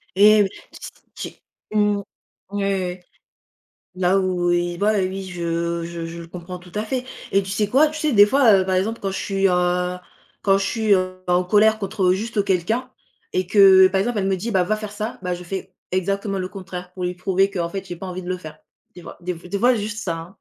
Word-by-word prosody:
Et 210 +2 +7
oui, 195 - -1 0.7
ç - - -8 0.3
j'ai 215 - -1
mmh, 205 -1 +3 0.5
ouais, 205 0 -2
ouais. 185 -2 -2 0.9
Là 185 +1 +2
où 180 -2 0
il 175 0 0
voit 210 +3 +3
oui, 190 -1 -1
je 170 -1 -2
je 170 0 -6
je 165 +1 -8
le 170 - -9
comprends 180 +1 -8
tout 180 0 -16
à 210 - -1
fait, 255 +3 -2 0.3
et 195 - +4
tu 190 - -7
sais 205 +2 0
quoi? 275 +8 +5
Tu 310 +1 -7
sais, 305 -2 0
des 205 -1 +8
fois, 255 0 +5
heu, 190 -2 +4
par 190 - +1
exemple, 210 +5 -1
quand 195 - -2
je 190 - -4
suis, 195 -1 +1
heu, 180 0 +1 0.5
quand 195 -1 +4
je 195 - -1
suis, 220 -2 +1
heu, 185 0 -2
ben, 180 - +2
en 180 +1 +2
colère 215 +4 +4
contre, 200 0 -4
heu, - - +4
juste 210 +1 -1
quelqu'un, 200 +7 0 0.4
et 185 0 0
que, 205 +3 -1 0.3
heu, - - 0
par 190 - +1
exemple, 230 +2 -1
elle 190 - 0
me 195 -1 +1
dit: 225 +6 -4
«Bah, 190 -4 +2
va 215 +4 0
faire 215 -1 -7
ça», 215 +2 -5
bah, 180 -1 -1
je 175 0 -9
fais 190 +1 -6 0.2
exactement 195 +2 -1
le 185 -1 -3
contraire, 180 -2 -8
pour 180 -1 -5
lui 180 0 -2
prouver 190 +1 +1
qu'en 175 -4 -2
fait, 195 +1 -5
j'ai 175 - -6
pas 190 - -7
envie 185 0 -5
de 180 - -8
le 185 - -1
faire. 155 -4 -10 0.4
Des 180 - -11
fois - - -10
des 180 +1 -3
f 165 - -15
des 200 - -2
fois, 245 +4 +4
juste 210 0 -4
ça, 165 -3 -2
hein. 170 +4 -11
190 Hz, 245 wpm, -22 LUFS, 180-205 Hz, 0.9 s, des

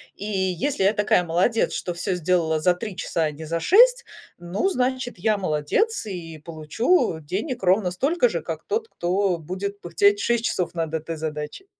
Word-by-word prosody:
и - - -9
если 190 - -1
я 200 +3 +4
такая 205 -3 +2
молодец, 180 +7 +1
что 175 -2 -3
всё 175 +2 -2
сделала 170 -2 +1
за 175 +3 +3
3 195 +2 -6
часа, 165 -2 -1
а 155 - 0
не 160 +2 -9
за 165 +2 -2
6, 480 - +5 0.3
ну, 175 - -1
значит, 255 - -1
я- 215 +3 +1
молодец, 195 - 0
и 170 -5 -7
получу 160 - 0
денег 195 - -4
ровно 185 +1 +3
столько 310 - +1
же, - - -3
как - - -6
тот, 445 +2 -1
кто 185 - 0
будет 195 +5 -5
пыхтеть 200 +4 +3
6 235 +2 +1
часов 180 -5 -1
над 160 -2 -2
этой 160 +1 -3
задачей. 150 - -5
185 Hz, 180 wpm, -24 LUFS, 165-225 Hz, 0.3 s, 6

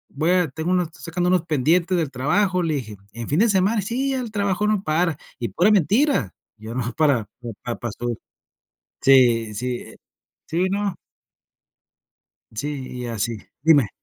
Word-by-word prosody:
voy 155 +4 +1
a 180 -2 +3
tengo 160 +5 -4
unos 180 -3 +1
sacando 175 +2 -2
unos 180 -2 +2
pendientes 170 +5 +2
del 160 -4 0
trabajo", 180 +8 +1
le 160 -2 0
dije. 110 -7 -5 0.2
"¿En 115 0 -6
fin 150 +6 +2
de 230 +1 +4
semana?". 200 +2 +2
"Sí, 255 +7 -1
ya 265 - -1
el 230 -3 -6
trabajo 200 -1 0
no 210 -2 +1
para", 160 -1 +1 0.2
y 120 - -2
pura 180 +5 +3
mentira, 210 - +2 0.2
yo 110 +1 -8
no 120 -2 -2
para, 140 -9 +2 0.4
pa 120 - -3
pa 120 - -4
so 120 +3 -5 1.0
sí, 120 -5 +5
sí, 125 +4 -2
e - - -12 0.5
sí, 175 +4 0
¿no? 200 0 -1 1.6
Sí, 140 +3 -4
y - - -4
así 115 0 -2 0.2
dime. 145 -8 +5
160 Hz, 165 wpm, -23 LUFS, 125-190 Hz, 1.6 s, sí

